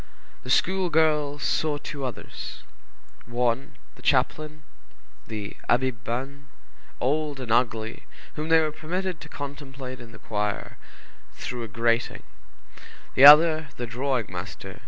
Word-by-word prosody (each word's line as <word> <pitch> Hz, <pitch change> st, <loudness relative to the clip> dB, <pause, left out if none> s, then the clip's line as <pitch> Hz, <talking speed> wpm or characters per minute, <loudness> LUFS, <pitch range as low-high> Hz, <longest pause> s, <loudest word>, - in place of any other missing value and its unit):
The 125 Hz, -, -10 dB
schoolgirls 155 Hz, -4 st, +2 dB
saw 150 Hz, -2 st, +1 dB
two 145 Hz, -1 st, -6 dB
others: 125 Hz, -5 st, -7 dB, 0.6 s
one, 120 Hz, +3 st, -1 dB, 0.2 s
the -, -, -18 dB
chaplain, 150 Hz, +3 st, 0 dB, 0.6 s
the 105 Hz, -2 st, -6 dB
Abbé 130 Hz, +2 st, +3 dB
Banés, 130 Hz, +5 st, -5 dB, 0.5 s
old 145 Hz, +1 st, 0 dB
and 125 Hz, -4 st, -5 dB
ugly, 115 Hz, -2 st, 0 dB, 0.3 s
whom 155 Hz, +1 st, -4 dB
they 160 Hz, 0 st, +6 dB
were 155 Hz, -1 st, 0 dB
permitted 180 Hz, +3 st, -4 dB
to -, -, -10 dB
contemplate 135 Hz, -2 st, -7 dB
in 120 Hz, -1 st, -11 dB
the -, -, -12 dB
choir, 105 Hz, -1 st, -3 dB, 0.6 s
through 125 Hz, -1 st, -5 dB
a 115 Hz, -, -4 dB
grating; 115 Hz, +1 st, 0 dB, 0.9 s
the 135 Hz, -, +7 dB
other 155 Hz, +1 st, +9 dB
the 120 Hz, -, -3 dB
drawing 125 Hz, +1 st, -1 dB
master, 95 Hz, +1 st, -7 dB
M. -, -, -13 dB
135 Hz, 130 wpm, -26 LUFS, 115-150 Hz, 0.9 s, other